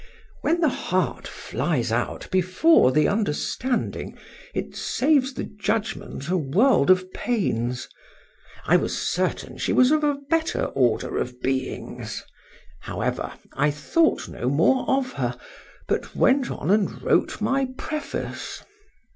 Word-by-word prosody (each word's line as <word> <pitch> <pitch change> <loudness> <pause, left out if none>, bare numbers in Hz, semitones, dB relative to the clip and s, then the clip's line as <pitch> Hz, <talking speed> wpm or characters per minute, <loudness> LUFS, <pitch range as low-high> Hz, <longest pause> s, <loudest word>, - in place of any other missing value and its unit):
When 335 +2 +1
the 320 - +5
heart 185 -7 -1
flies 125 -9 -2
out 120 +1 -2
before 185 - +4
the 150 +2 +3
understanding, 225 - -1 0.3
it - - -4
saves 275 -1 +1
the - - -3
judgment 210 - -3
a 185 +2 +1
world 175 - +3
of 185 0 +3
pains.—I 125 - -2
was - - -2
certain - - -2
she - - 0
was 255 +2 +5
of 305 0 +3
a 290 -1 +2
better 325 +1 +1
order 120 -4 +1
of 125 0 -4
beings;—however, 130 - -5 0.2
I 145 - +2
thought 315 - +1
no 125 - -3
more 165 - +3
of 265 -1 +1
her, - - -2 0.5
but - - -2
went 265 -1 +3
on 155 - -2
and 210 -1 +1
wrote - - +2
my 275 -1 +1
preface. 305 -1 -5
200 Hz, 120 wpm, -24 LUFS, -, 0.5 s, the